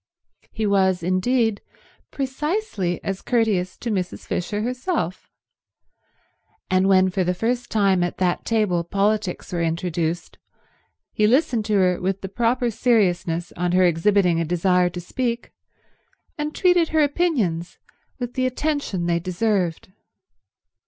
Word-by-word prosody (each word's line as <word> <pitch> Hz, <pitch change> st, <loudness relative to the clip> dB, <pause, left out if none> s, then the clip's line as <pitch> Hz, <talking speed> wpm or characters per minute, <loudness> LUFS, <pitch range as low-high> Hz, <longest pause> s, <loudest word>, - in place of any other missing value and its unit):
He 220 Hz, -, -2 dB
was, 190 Hz, -3 st, +2 dB
indeed, 220 Hz, +5 st, +1 dB, 0.5 s
precisely 270 Hz, -, -2 dB
as 195 Hz, -1 st, -3 dB
courteous 215 Hz, -7 st, 0 dB
to 235 Hz, -, -4 dB
Mrs. 185 Hz, -3 st, -3 dB
Fisher 205 Hz, +4 st, -2 dB
herself; 250 Hz, -, -3 dB, 1.4 s
and 185 Hz, +1 st, +3 dB
when 185 Hz, -1 st, +4 dB
for 185 Hz, 0 st, 0 dB
the 180 Hz, +1 st, 0 dB
first 240 Hz, +4 st, -1 dB
time 195 Hz, -4 st, +2 dB
at 175 Hz, 0 st, -2 dB
that 180 Hz, -2 st, 0 dB
table 210 Hz, -7 st, +1 dB
politics 200 Hz, +1 st, -1 dB
were 170 Hz, -, -1 dB
introduced, 165 Hz, 0 st, -2 dB, 0.7 s
he 210 Hz, -, +3 dB
listened 240 Hz, -3 st, +2 dB
to 210 Hz, -, 0 dB
her 180 Hz, -2 st, +2 dB
with 190 Hz, +1 st, -1 dB
the 190 Hz, -, -5 dB
proper 235 Hz, +3 st, 0 dB
seriousness 180 Hz, -7 st, +1 dB
on 175 Hz, 0 st, -1 dB
her 185 Hz, 0 st, +4 dB
exhibiting 175 Hz, 0 st, +3 dB
a -, -, +1 dB
desire 180 Hz, +2 st, +2 dB
to 175 Hz, -, -7 dB
speak, 235 Hz, +6 st, -3 dB, 0.8 s
and 300 Hz, 0 st, -4 dB
treated 355 Hz, -3 st, +3 dB
her 315 Hz, -1 st, +3 dB
opinions 255 Hz, -, 0 dB, 0.4 s
with 245 Hz, -1 st, -5 dB
the 255 Hz, 0 st, +1 dB
attention 255 Hz, -, -2 dB
they 170 Hz, 0 st, +1 dB
deserved. 185 Hz, -1 st, -1 dB
195 Hz, 130 wpm, -23 LUFS, 180-240 Hz, 1.4 s, when